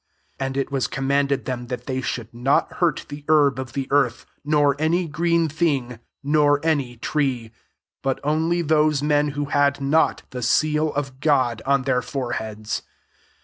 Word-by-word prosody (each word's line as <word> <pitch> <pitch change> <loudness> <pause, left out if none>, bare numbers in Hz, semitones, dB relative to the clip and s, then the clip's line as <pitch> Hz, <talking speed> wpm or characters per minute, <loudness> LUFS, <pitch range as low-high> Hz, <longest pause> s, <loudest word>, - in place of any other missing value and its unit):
4 135 - -1
And 135 0 -5
it 135 - -1
was 135 -4 0
command 140 +2 0
ed 140 -1 -1
them 125 -1 -4
that 125 -1 -5
they 130 -1 -2
should 120 -3 -4
not 125 +4 +1
iurt 175 -2 +1
the 145 0 -8
herb 145 -4 +4
of 130 -1 -6
the 135 -1 -3
earth, 135 -4 +2 0.2
nor 145 -1 +3
my 165 +4 +2
green 170 +1 +1
thing, 140 -7 -1 0.2
nor 145 0 +3
any 140 -7 0
tree; 125 -4 -1 0.5
iut 135 -1 0
(mlif 160 +3 0
those 155 -2 +3
men 150 0 +2
who 145 - 0
had 145 0 +2
lot 140 +4 +2
the 125 - -5
seal 150 +5 +2
[of 135 -2 -4
Godj 130 -7 +2
on 140 -1 +3
[their] 125 -2 +1
'orebeads. 110 -5 -4
140 Hz, 170 wpm, -23 LUFS, 130-150 Hz, 0.5 s, herb